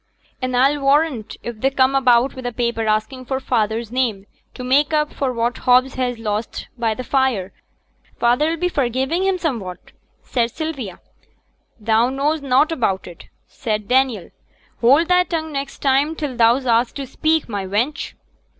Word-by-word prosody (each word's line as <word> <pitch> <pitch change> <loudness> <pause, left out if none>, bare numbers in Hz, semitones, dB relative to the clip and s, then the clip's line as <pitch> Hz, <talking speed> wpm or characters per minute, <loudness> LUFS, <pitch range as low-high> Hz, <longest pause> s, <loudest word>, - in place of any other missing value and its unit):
'An' 255 -1 -1
a'll 275 +3 +3
warrant 275 -5 +1
if 235 -2 -7
they 270 - +3
come 270 -1 +2
about 255 -1 +3
wi' 260 - -7
a - - -10
paper 235 -1 -1
asking 215 +5 -1
for 265 +1 -2
feyther's 225 -3 -1
name 235 -6 -1 0.3
to 250 - -7
make 285 +5 +2
up 300 0 +1
for 270 -2 -1
what 235 0 -1
Hobbs 255 +1 +3
has 250 -2 -2
lost 215 0 -4
by 230 -3 -1
t' 255 - -5
fire, 250 -8 0 0.7
feyther 250 +7 +3
'll 335 - -2
be 360 +2 0
for 280 -8 0
giving 265 +9 -1
him 385 -1 +1
summut,' 230 - -4 0.3
said 235 -2 0
Sylvia. 275 - -5 0.8
'Thou 225 +3 +2
knows 285 +4 0
nought 275 +3 +3
about 220 -11 -1
it,' 175 -2 -12 0.2
said 215 -4 -3
Daniel. 250 -7 +1 0.5
'Hold 275 +8 +4
thy 360 0 +4
tongue 320 -3 -3
next 275 -1 -5
time 280 +3 +2
till 295 -5 -4
thou's 240 +3 +3
axed 235 0 +2
to 275 - -4
speak, 315 +4 0
my 200 -4 -4
wench.' 230 +10 -2
255 Hz, 170 wpm, -20 LUFS, 230-280 Hz, 0.8 s, Hold